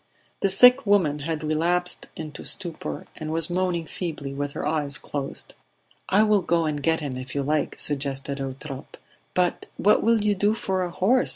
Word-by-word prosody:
The 195 Hz, -, +2 dB
sick 250 Hz, +4 st, +6 dB
woman 175 Hz, -8 st, +3 dB
had 155 Hz, +1 st, -3 dB
relapsed 170 Hz, +4 st, 0 dB
into 155 Hz, -2 st, -7 dB
stupor, 175 Hz, -5 st, +1 dB
and 155 Hz, 0 st, -5 dB
was 165 Hz, +1 st, 0 dB
moaning 180 Hz, -2 st, 0 dB
feebly 150 Hz, -5 st, -5 dB
with 145 Hz, 0 st, -4 dB
her -, -, -3 dB
eyes 150 Hz, -2 st, -1 dB
closed. 140 Hz, -2 st, -6 dB, 0.6 s
"I 205 Hz, +3 st, +5 dB
will 210 Hz, -2 st, +3 dB
go 170 Hz, -1 st, +1 dB
and 150 Hz, -2 st, -2 dB
get 160 Hz, +2 st, +1 dB
him 135 Hz, -4 st, -4 dB
if 130 Hz, +1 st, -7 dB
you 140 Hz, -, 0 dB
like," 150 Hz, +1 st, -1 dB
suggested 140 Hz, -1 st, 0 dB
Eutrope. 135 Hz, 0 st, -7 dB, 0.4 s
"But 180 Hz, -1 st, 0 dB
what 210 Hz, -, +4 dB
will 230 Hz, 0 st, +3 dB
you 210 Hz, 0 st, +2 dB
do 205 Hz, +2 st, +1 dB
for 190 Hz, -4 st, -2 dB
a 180 Hz, -, -1 dB
horse?" 215 Hz, +9 st, +2 dB
160 Hz, 180 wpm, -25 LUFS, 145-185 Hz, 0.6 s, sick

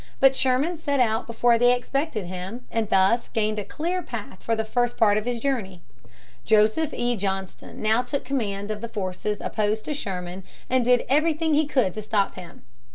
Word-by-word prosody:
But 270 Hz, 0 st, +6 dB
Sherman 270 Hz, +8 st, +1 dB
set 285 Hz, -3 st, -1 dB
out 225 Hz, -1 st, +1 dB
before 235 Hz, 0 st, +3 dB
they 245 Hz, +1 st, +5 dB
expected 260 Hz, -, -2 dB
him, 185 Hz, +7 st, -6 dB
and 225 Hz, -2 st, -1 dB
thus 195 Hz, +5 st, +3 dB
gained 215 Hz, -2 st, 0 dB
a -, -, -3 dB
clear 345 Hz, -, -2 dB
path 220 Hz, -, -7 dB
for 230 Hz, -, 0 dB
the 220 Hz, 0 st, -2 dB
first 240 Hz, +2 st, 0 dB
part 210 Hz, -3 st, +4 dB
of 215 Hz, +1 st, -1 dB
his 245 Hz, -1 st, -2 dB
journey. 215 Hz, -10 st, -2 dB, 0.6 s
Joseph 220 Hz, +8 st, +3 dB
E. 240 Hz, 0 st, 0 dB
Johnston 195 Hz, -1 st, -4 dB
now 220 Hz, +2 st, +3 dB
took 270 Hz, +3 st, -4 dB
command 210 Hz, -6 st, -2 dB
of 210 Hz, -1 st, -4 dB
the 235 Hz, -, -5 dB
forces 200 Hz, 0 st, -3 dB
opposed 215 Hz, 0 st, -1 dB
to 300 Hz, -, -2 dB
Sherman 185 Hz, -7 st, -5 dB, 0.3 s
and 255 Hz, -1 st, +3 dB
did 245 Hz, 0 st, +3 dB
everything 310 Hz, +3 st, +2 dB
he 300 Hz, 0 st, +3 dB
could 255 Hz, -11 st, +1 dB
to 215 Hz, -, -5 dB
stop 210 Hz, -2 st, 0 dB
him. 175 Hz, -2 st, -11 dB
230 Hz, 190 wpm, -25 LUFS, 205-260 Hz, 0.6 s, But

